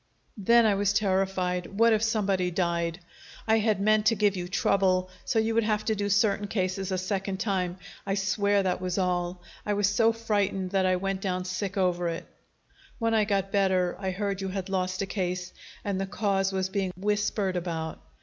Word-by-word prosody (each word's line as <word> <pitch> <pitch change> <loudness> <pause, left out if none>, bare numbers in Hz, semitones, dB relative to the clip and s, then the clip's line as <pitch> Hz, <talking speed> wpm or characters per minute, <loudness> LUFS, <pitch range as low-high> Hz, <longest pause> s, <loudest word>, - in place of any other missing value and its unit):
"Then 235 +4 +5
I 210 - +4
was 200 0 +1
terrified. 190 -2 0
What 230 +1 +5
if 215 - +2
somebody 200 -5 +1
died? 170 -1 -1 0.5
I 220 0 +4
had 215 -2 +1
meant 215 +1 +3
to 225 - +4
give 205 -1 +2
you 175 -1 -4
trouble, 185 0 +1
so - - 0
you 225 0 +2
would 230 0 +3
have 215 0 0
to 220 - +1
do 205 -1 -2
certain 205 0 +2
cases 190 -1 -2
a 185 - 0
second 190 +1 -2
time. 185 -4 -1 0.3
I 195 -1 -1
swear 200 +1 +1
that 185 -1 -1
was 180 0 -2
all. 180 -1 -1 0.2
I 210 - -1
was 205 0 +2
so 225 +2 +3
frightened 205 -4 -1
that 190 -1 +2
I 185 - +3
went 195 +1 -2
down 185 -2 -2
sick 195 +2 -3
over 180 -2 +1
it. 165 0 -4 0.7
When 230 -2 0
I 215 -1 +3
got 195 -2 0
better, 190 -3 +2
I 190 -1 -2
heard 195 +1 -2
you 195 - -2
had 190 0 -4
lost 185 0 -1
a - - -1
case 180 -2 -3 0.3
and 195 -2 -1
the 195 - -2
cause 195 -1 0
was 190 -1 -1
being 190 -1 -2
whispered 205 -1 0
about. 165 -2 -4
195 Hz, 195 wpm, -27 LUFS, 185-205 Hz, 0.7 s, Then